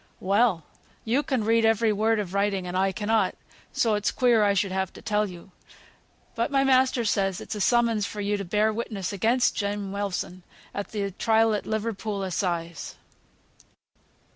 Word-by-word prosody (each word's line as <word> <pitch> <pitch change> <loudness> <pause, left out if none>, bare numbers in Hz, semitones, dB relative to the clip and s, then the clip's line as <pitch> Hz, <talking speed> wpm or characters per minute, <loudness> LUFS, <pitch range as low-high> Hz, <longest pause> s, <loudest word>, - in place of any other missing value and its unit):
"Well! 200 -3 +2 0.4
yo 240 +6 +2
can 265 -7 -1
read 225 +1 +3 0.3
word 220 +2 +1
of 190 -3 -4
writing 200 -2 0
and 180 0 -5
I 190 +1 +2
cannot, 215 +3 0 0.4
so 225 -2 +1
it's 210 +1 +1
queer 240 -4 +3
I 200 -1 +3
should 195 0 0
have 190 -1 -1
to - - -12
tell 210 -1 0
you. 180 +2 -12 0.8
But 230 +1 -1
my 275 -1 +2
master 260 -2 +3
says 195 -3 0
it's - - -6
a 210 - -4
summons 230 -1 +2
for 210 - -7
yo 205 0 0
to 200 - -4
bear 210 +4 +1
witness 210 -4 -4
again 225 +5 +2 0.2
Jem 200 -1 -3
Wilson, 195 -2 -3 0.3
at 200 - -4
th' 200 -3 -3
trial 225 0 +3
at 210 - -3
Liverpool 215 -2 -2
Assize." 170 -3 -3
210 Hz, 165 wpm, -26 LUFS, 195-225 Hz, 0.8 s, read